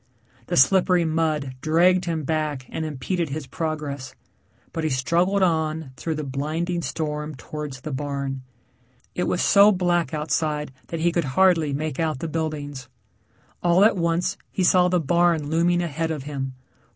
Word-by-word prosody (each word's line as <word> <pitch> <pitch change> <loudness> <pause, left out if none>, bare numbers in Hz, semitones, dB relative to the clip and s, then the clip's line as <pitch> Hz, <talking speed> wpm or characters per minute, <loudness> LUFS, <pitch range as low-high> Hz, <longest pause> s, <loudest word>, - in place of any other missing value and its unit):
The - - -1
slippery 180 +5 +4
mud 155 -4 0
dragged 180 +3 +3
him 165 -3 -2
back 150 -3 -2
and 160 - -4
impeded 155 +3 -2
his 145 +1 -4
progress, 150 -3 -4 0.6
but 165 - -3
he 155 - +1
struggled 175 +9 +1
on 160 -4 0
through 160 +4 -3
the 155 - -3
blinding 155 +6 -2
storm 150 -2 -3
towards 140 0 -7
the 155 - -6
barn. 140 -1 -3 0.7
It 180 - -1
was 175 - 0
so 200 +1 +7
black 175 -5 +1
outside 150 -1 -1 0.2
that 165 -1 -4
he 175 +1 +3
could 170 -2 0
hardly 175 -6 +4
make 150 0 -3
out 160 -4 0
the 165 - -4
buildings. 150 -4 -4 0.7
All 175 +3 +5
at 220 - +4
once 175 +2 0
he 190 - -1
saw 180 0 +5
the 180 0 +2
barn 165 -1 +2
looming 175 +2 +2
ahead 165 0 -2
of 155 -4 -3
him. 135 -2 -5
160 Hz, 160 wpm, -24 LUFS, 145-175 Hz, 0.7 s, so